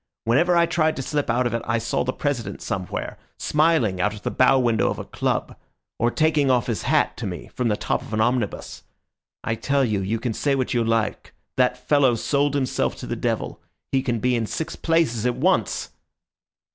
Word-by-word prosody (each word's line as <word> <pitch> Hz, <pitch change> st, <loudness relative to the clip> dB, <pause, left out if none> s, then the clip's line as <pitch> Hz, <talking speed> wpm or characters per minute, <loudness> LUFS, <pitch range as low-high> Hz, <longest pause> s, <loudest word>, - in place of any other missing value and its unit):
Whenever 170 Hz, +10 st, +3 dB
I 170 Hz, -, +5 dB
tried 160 Hz, -2 st, +1 dB
to 135 Hz, -, -4 dB
slip 145 Hz, 0 st, -2 dB
out 125 Hz, +2 st, +2 dB
of 120 Hz, -, -1 dB
it 115 Hz, -, -1 dB
I 115 Hz, +1 st, 0 dB
saw 115 Hz, +1 st, -1 dB
the 130 Hz, -, -1 dB
President 120 Hz, -9 st, -3 dB
somewhere, 95 Hz, -1 st, -4 dB, 0.2 s
smiling 150 Hz, -, +2 dB
out 105 Hz, +2 st, 0 dB
of 105 Hz, -, -12 dB
the -, -, -1 dB
bow 130 Hz, +1 st, +4 dB
window 120 Hz, -3 st, +2 dB
of -, -, -3 dB
a -, -, -6 dB
club, -, -, -2 dB, 0.4 s
or 120 Hz, -, +3 dB
taking 155 Hz, 0 st, +2 dB
off 125 Hz, -2 st, +3 dB
his 115 Hz, -3 st, -2 dB
hat -, -, +1 dB
to -, -, -4 dB
me -, -, -7 dB
from 125 Hz, -, -1 dB
the 105 Hz, -2 st, +1 dB
top -, -, -1 dB
of -, -, -11 dB
an 110 Hz, -, -1 dB
omnibus. 120 Hz, -2 st, -1 dB, 0.6 s
I 110 Hz, -, -1 dB
tell 140 Hz, +4 st, +1 dB
you, 105 Hz, -4 st, 0 dB
you 100 Hz, +4 st, -1 dB
can 115 Hz, 0 st, -2 dB
say 140 Hz, +5 st, 0 dB
what 130 Hz, -2 st, -1 dB
you 120 Hz, -1 st, +2 dB
like, 115 Hz, -2 st, -1 dB, 0.2 s
that 125 Hz, 0 st, +2 dB
fellow 130 Hz, -1 st, +3 dB
sold 145 Hz, +4 st, 0 dB
himself 135 Hz, -2 st, 0 dB
to -, -, -8 dB
the -, -, -3 dB
devil; -, -, -2 dB, 0.3 s
he 135 Hz, -, +2 dB
can 120 Hz, -2 st, -1 dB
be 125 Hz, +2 st, +1 dB
in 115 Hz, -2 st, -1 dB
six 160 Hz, -, -4 dB
places 160 Hz, -9 st, +1 dB
at 125 Hz, -, 0 dB
once." -, -, 0 dB
125 Hz, 210 wpm, -23 LUFS, 115-140 Hz, 0.6 s, I